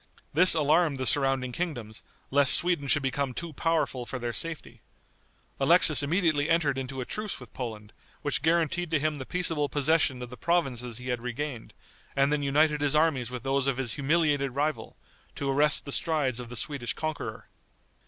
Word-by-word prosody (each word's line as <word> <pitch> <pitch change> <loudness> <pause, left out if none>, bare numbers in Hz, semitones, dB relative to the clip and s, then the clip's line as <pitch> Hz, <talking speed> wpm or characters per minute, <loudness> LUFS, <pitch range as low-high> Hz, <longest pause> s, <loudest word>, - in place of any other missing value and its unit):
This 175 +4 +8
alarmed 155 0 +2
the 130 - -3
surrounding 135 -2 +1
kingdoms, 120 -9 -5 0.3
lest 140 -1 +6
Sweden 170 -5 0
should 140 +2 +2
become 135 -1 -2
too 170 -2 -6
powerful 155 -5 -1
for 125 - -5
their 120 -1 -4
safety. 165 +3 -5 0.8
Alexis 155 +2 +5
immediately 155 -1 +1
entered 160 -5 +2
into 135 0 -5
a - - -4
truce 210 +6 -5
with 125 -4 -14
Poland, 110 -4 -7 0.3
which 145 -3 -1
guaranteed 170 +2 +1
to 160 -2 +1
him 155 0 -2
the 130 - -7
peaceable 165 -5 -1
possession 145 -3 +1
of 125 - -9
the 125 - -9
provinces 125 -9 -1
he 125 +1 -7
had 125 -1 -2
regained, 125 0 -6 0.4
and 140 +2 +2
then 150 - 0
united 150 +2 +2
his 145 0 +1
armies 150 -7 +1
with 125 -1 -7
those 135 0 0
of 135 -2 0
his 125 -3 -3
humiliated 145 -2 0
rival, 150 +2 -2 0.4
to 140 - -4
arrest 145 +2 +3
the 140 - -6
strides 140 -6 0
of 120 -2 -7
the 125 - -7
Swedish 120 +1 -2
conqueror. 155 -1 -5
140 Hz, 180 wpm, -27 LUFS, 130-155 Hz, 0.8 s, This